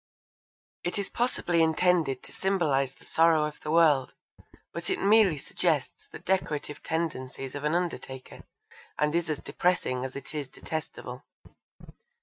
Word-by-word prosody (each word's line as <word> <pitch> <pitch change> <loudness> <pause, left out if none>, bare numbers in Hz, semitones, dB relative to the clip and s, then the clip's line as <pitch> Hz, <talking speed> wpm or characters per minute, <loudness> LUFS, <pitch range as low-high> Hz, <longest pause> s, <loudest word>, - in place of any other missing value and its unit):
It 175 - -2
is 200 -1 -2
possibly 175 -8 +1
intended 160 -4 +2
to - - -11
symbolise 145 -9 +1
the - - -20
sorrow 165 -1 +4
of 150 0 -6
the 150 - -6
world, 155 -5 +4 0.6
but 170 0 -4
it - - 0
merely 200 -5 +5
suggests - - -1
the - - -9
decorative 150 -6 -1
tendencies 135 -5 -3
of 145 - -5
an 150 +2 +2
undertaker 165 -7 -4 0.6
and 150 0 +1
is 170 -1 0
as 150 - -2
depressing 150 -8 0
as 130 0 -5
it 140 +2 -7
is 145 -3 -4
detestable. 155 +3 -6
160 Hz, 140 wpm, -28 LUFS, 140-175 Hz, 0.6 s, merely